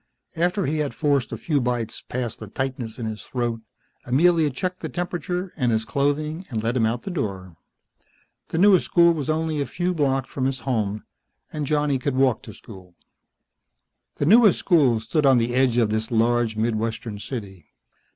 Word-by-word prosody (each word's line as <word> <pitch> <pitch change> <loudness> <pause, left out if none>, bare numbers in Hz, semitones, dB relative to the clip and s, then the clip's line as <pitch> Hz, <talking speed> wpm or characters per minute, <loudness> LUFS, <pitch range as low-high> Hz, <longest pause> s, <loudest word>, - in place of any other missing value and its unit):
After 180 +3 +1
he 155 +3 -1
had 145 -2 -2
forced 140 -4 +1
a - - -4
few 150 -4 0
bites 120 -2 -2
past 120 -3 -3
the 110 - -8
tightness 130 0 -4
in 120 - -4
his 110 -1 -5
throat, 120 -3 -3 0.4
Amelia 160 +4 +3
checked 180 +7 -4
the - - -5
temperature 180 +1 -3
and 125 -5 +1
his 110 0 0
clothing 145 - -1
and 110 -4 -3
let 115 +2 0
him 115 -3 +3
out 120 +2 -2
the 195 - -5
door. 95 - -4 0.9
The - - -4
newest 190 0 +5
school 170 -1 +5
was 150 -4 -4
only 155 -1 0
a 140 - -2
few 180 +5 -1
blocks 135 -5 0
from 130 - -2
his 130 -1 -2
home, 110 -5 -2 0.5
and 150 -2 -3
Johnny 145 -2 +1
could 135 +1 -2
walk 130 -3 +2
to 110 - -11
school. 95 -5 -14 1.2
The - - -1
newest 215 +3 +6
school 140 - +3
stood 140 +7 0
on 135 -2 +6
the 120 +1 0
edge 130 -2 +2
of 115 -3 +2
this 110 +1 -1
large, 115 -1 +1
middlewestern 110 -1 -2
city. 100 - -7
130 Hz, 180 wpm, -23 LUFS, 115-155 Hz, 1.2 s, newest